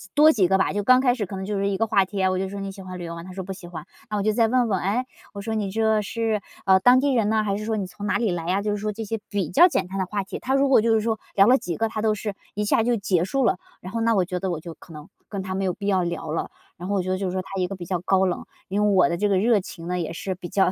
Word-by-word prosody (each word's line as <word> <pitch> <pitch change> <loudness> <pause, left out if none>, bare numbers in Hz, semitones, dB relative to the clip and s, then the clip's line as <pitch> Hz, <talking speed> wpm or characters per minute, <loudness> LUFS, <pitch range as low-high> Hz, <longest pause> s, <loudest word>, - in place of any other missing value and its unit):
多 305 +2 +7
几 200 - +3
个 190 +2 +3
吧， 190 - +1
就 205 - 0
刚 255 +5 +6
开 255 -2 +3
始 220 -6 -3
可 195 - -6
能 190 0 -5
就 205 0 -2
是 200 - 0
一 195 - -1
个 225 - +2
话 205 -3 +3
题， 200 +2 -8
然 190 -1 +2
后 - - 0
我 185 - -1
就 190 0 -2
说 200 +1 -6
你 195 0 -4
喜 195 0 -11
欢 185 -1 -8
旅 175 - -7
游 170 0 -6
吗？ 170 - -8
他 185 - -10
说 190 0 -5
不 190 +1 -6
喜 185 -2 -11
欢， 165 -3 -8 0.2
那 210 - -1
我 200 - -1
就 215 +1 +2
再 225 0 +3
问 245 +1 +2
问， 195 -4 0
诶， 220 +7 0 0.3
我 200 - -6
说 220 +2 -3
你 210 -3 -1
这 220 +1 +2
是， 220 0 -1 0.2
啊， 190 -1 +6
当 245 +5 +6
地 280 0 +1
人 225 -4 +2
呢， 220 0 +2
还 200 -2 -1
是 210 +1 -4
说 220 0 -1
你 200 - -2
从 205 +3 -7
哪 - - +2
里 225 -5 0
来 170 -1 -3
呀？ 190 +3 +1
就 210 - 0
是 205 - -1
说 210 +1 -2
这 220 +2 -6
些 225 +2 -3
比 195 -6 -1
较 345 +6 +7
简 195 - -1
单 195 +1 -5
的 190 - 0
话 200 +1 -2
题， 190 - -7
他 265 +1 0
如 275 0 +3
果 260 - +6
就 225 +1 +2
是 220 - +2
说 220 0 -1 0.2
聊 195 - +6
了 250 +4 +6
几 170 -1 -4
个， 225 - +1
他 220 -1 -4
都 215 -1 +2
是 210 -1 -4 0.2
一 210 +1 -1
下 210 - +3
就 240 +2 +2
结 195 -5 +1
束 265 +7 0
了， 230 - +2 0.2
然 185 - -9
后 230 - -1
那 230 0 +3
我 185 -3 +2
觉 180 0 -3
得 190 +1 -2
我 170 -3 -2
就 165 +1 -8
可 165 - -17
能 150 0 -10 0.2
跟 200 -2 -4
他 190 0 -4
没 195 0 -1
有 185 - 0
必 200 - -8
要 190 -2 +3
聊 170 -2 -4
了， 160 - -2 0.3
然 180 - -7
后 205 - +1
我 195 - +2
觉 185 - -4
得 185 - 0
就 195 0 -2
是 - - -2
说 185 0 -2
他 195 0 -4
一 180 - +1
个 195 - -6
比 180 -2 -8
较 180 0 -1
高 190 +1 +2
冷， 180 - -2 0.2
因 205 +2 +1
为 210 - +3
我 185 -2 +5
的 170 - -1
这 205 +3 +1
个 195 - +3
热 220 +2 +3
情 170 -3 -9
呢 180 0 -1
也 165 -1 -3
是 190 +3 -4
比 180 -1 -8
较 190 -2 +2
200 Hz, 390 characters per minute, -24 LUFS, 185-220 Hz, 0.3 s, 多